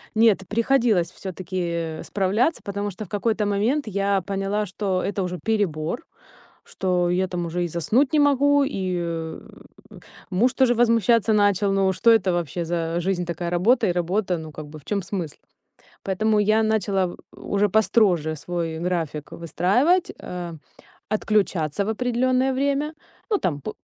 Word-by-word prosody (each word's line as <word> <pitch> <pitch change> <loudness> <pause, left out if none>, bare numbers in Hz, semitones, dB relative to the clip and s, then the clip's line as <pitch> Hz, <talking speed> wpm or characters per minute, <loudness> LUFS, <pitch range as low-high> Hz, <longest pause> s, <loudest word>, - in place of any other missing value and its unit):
Нет, 220 -3 +4
приходилось 230 -6 +2
всё-таки 170 -3 -4
справляться, 210 - 0
потому 200 +1 -3
что 205 +3 -7
в - - -16
какой-то 210 +1 0
момент 220 +7 0
я 200 -1 0
поняла, 195 +3 -2
что 190 -1 -2
это 200 0 -2
уже 180 -1 -4
перебор, 205 - -1 0.6
что 180 -2 -1
я 185 +2 +1
там 180 -1 -3
уже 175 +1 -2
и - - -2
заснуть 220 - +1
не 305 - +4
могу, 285 0 +4
и 175 -7 -3 0.9
муж 225 +7 +2
тоже 260 -2 +3
возмущаться 230 -1 +3
начал: 205 -1 +3
"Ну, 195 -1 +2
что 230 +5 +4
это 200 -5 +3
вообще 175 -1 -2
за 165 0 -2
жизнь 180 0 -1
такая: 170 0 -3
работа 195 +9 +3
и - - +2
работа? 180 +1 0
Ну, 160 -1 -8
как 150 0 -8
бы 150 +1 -10
в 145 - -16
чём 205 -1 -1
смысл?" 175 -5 -5 0.7
Поэтому 215 +2 +1
я 215 +2 +3
начала 195 -4 0 0.2
уже 205 +1 0
построже 195 -7 +2
свой 165 0 -4
график 165 -4 -3
выстраивать, 210 - +1
а, 175 -2 -6 0.5
отключаться 200 -5 0
в - - -4
определённое 255 +3 +1
время. 280 +3 0 0.4
Ну, 415 - +3
там 145 - -2
п - - -5
195 Hz, 150 wpm, -23 LUFS, 175-220 Hz, 0.9 s, Нет